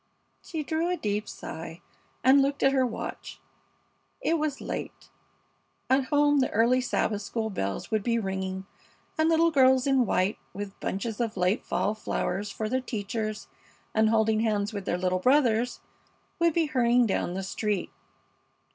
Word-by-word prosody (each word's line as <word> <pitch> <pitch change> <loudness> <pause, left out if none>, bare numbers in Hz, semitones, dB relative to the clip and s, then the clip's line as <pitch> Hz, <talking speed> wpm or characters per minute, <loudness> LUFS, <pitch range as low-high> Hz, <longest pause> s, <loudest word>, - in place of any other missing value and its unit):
She 320 -3 -5
drew 320 +3 -1
a 360 - 0
deep 210 -3 -2
sigh 165 +1 -8 0.4
and 270 +2 +6
looked 280 +1 0
at 270 - +5
her 260 -2 +2
watch. 225 - -6 0.8
It 330 0 +1
was 300 -2 -1
late. - - -6 0.8
At 265 0 +4
home 290 0 +3
the 260 - +2
early 235 +4 +3
Sabbath 215 -4 -1
school 220 +1 -3
bells 100 - -3
would 215 -1 +1
be 230 +3 +1
ringing, 190 -2 -3 0.5
and 315 0 +2
little 330 0 +4
girls 260 -3 +5
in 270 -3 +3
white, 185 +3 +1 0.2
with 200 0 -6
bunches 210 +3 -3
of 225 -3 -2
late 180 +4 +1
fall 210 - 0
flowers 205 -2 -2
for 215 +2 -3
their 260 +4 0
teachers, 215 -2 -4 0.5
and 220 0 +3
holding 220 -1 +3
hands 215 -1 0
with 200 -2 -5
their 175 - 0
little 185 0 0
brothers, 245 0 +2 0.6
would 335 -2 +3
be 335 -1 +3
hurrying 245 -4 +3
down 185 -4 -1
the 190 - -3
street. 205 +1 -2
225 Hz, 160 wpm, -27 LUFS, 205-270 Hz, 0.8 s, and